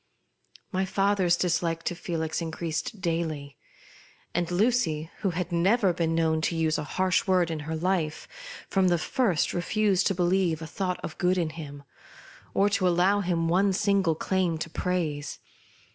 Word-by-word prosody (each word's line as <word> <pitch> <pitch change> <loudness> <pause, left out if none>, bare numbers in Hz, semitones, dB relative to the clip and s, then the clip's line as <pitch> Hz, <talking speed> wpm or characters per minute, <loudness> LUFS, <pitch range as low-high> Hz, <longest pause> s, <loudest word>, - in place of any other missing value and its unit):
My 190 -1 0
father's 190 -2 +2
dislike 165 -2 0
to - - -1
Felix 165 -2 -3
increased 165 +4 -4
daily; 160 -5 -2 0.8
and 175 0 0
Lucy, 180 -6 +1
who 195 - 0
had 180 +1 -3
never 190 +3 +3
been 165 -1 0
known 160 -1 +2
to 165 - 0
use 160 -1 +1
a - - -3
harsh 185 0 +2
word 180 -3 +3
in 160 - -3
her 160 - -1
life, 165 -2 -1 0.4
from 190 -1 +2
the 175 -1 +3
first 190 - 0
re 175 - -1
fused 200 0 +2
to 195 - 0
believe 175 -2 +1
a 160 - -6
thought 180 +2 -3
of 160 - -6
good 180 +1 +2
in 165 -3 0
him, 145 -3 -9 0.7
or 200 - +4
to 195 -2 +1
allow 180 +3 +3
him 175 -4 0
one 190 +4 +3
single 195 -4 +2
claim 180 -1 0
to 160 +1 -5
praise. 160 -6 -2
175 Hz, 165 wpm, -27 LUFS, 160-190 Hz, 0.8 s, or